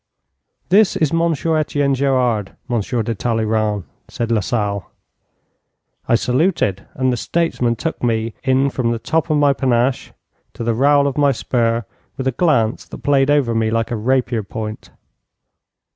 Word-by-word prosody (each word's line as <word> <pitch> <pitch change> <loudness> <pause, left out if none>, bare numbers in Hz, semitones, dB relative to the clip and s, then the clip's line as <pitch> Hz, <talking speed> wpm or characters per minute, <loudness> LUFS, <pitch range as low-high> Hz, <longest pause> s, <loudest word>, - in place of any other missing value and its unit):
'This 200 +2 +4
is 155 -1 0
Monsieur 165 -1 +1
Etienne 145 -2 0
Gerard, 125 -6 0
Monsieur 120 -1 -1
de 115 - -2
Talleyrand,' 110 -2 -1 0.2
said 115 -1 -3
Lasalle. 105 -3 -1 1.2
I 115 - +4
saluted, 125 - 0
and 130 -1 +1
the - - 0
statesman 125 -5 0
took 165 +7 -4
me 115 -2 0
in 135 +1 +2
from 125 -3 -1
the 115 - 0
top 160 +8 -1
of 155 - +2
my 145 -1 +4
panache 130 -1 0 0.4
to - - -5
the 115 0 +1
rowel 140 +4 +4
of 140 0 -1
my 145 -1 +4
spur, 115 -2 0 0.3
with 130 - -4
a 130 - +2
glance 125 -6 +1
that - - -9
played 140 -1 +3
over 145 -5 +2
me 110 -1 +1
like 115 +1 -1
a - - 0
rapier 120 0 0
point. 110 +1 -7
125 Hz, 155 wpm, -19 LUFS, 115-140 Hz, 1.2 s, This